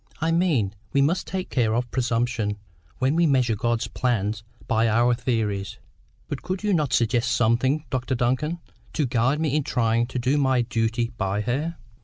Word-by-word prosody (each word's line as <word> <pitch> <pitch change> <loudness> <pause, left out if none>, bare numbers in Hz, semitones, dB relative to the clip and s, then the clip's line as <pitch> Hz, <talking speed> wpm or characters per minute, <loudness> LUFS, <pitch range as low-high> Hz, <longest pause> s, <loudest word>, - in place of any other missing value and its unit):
I 160 +2 +1
mean 160 - +2 0.2
we 140 - +4
must 170 +6 0
take 185 0 -4
care 115 -4 +1
of 120 0 -2
presumption 120 -4 0 0.4
when 130 +3 +1
we 170 0 +4
measure 130 -5 +2
God's 120 +1 -1
plans 110 -4 -1 0.2
by 115 0 +2
our 120 +2 +3
theories. 110 -6 -2 0.5
But 140 - -5
could 185 +2 -4
you 210 -1 +2
not 150 -7 +1
suggest 120 +1 +2
something, 120 +6 +2
Doctor 130 -1 -1
Duncan, 130 +7 0 0.4
to 150 - +1
guide 130 +4 +1
me 155 -3 0
in 150 - +1
trying 115 -2 +1
to 130 - -5
do 130 +4 +1
my 130 -3 +2
duty 115 0 -1
by 95 +2 0
her?" 145 +9 -2
125 Hz, 175 wpm, -24 LUFS, 115-145 Hz, 0.5 s, we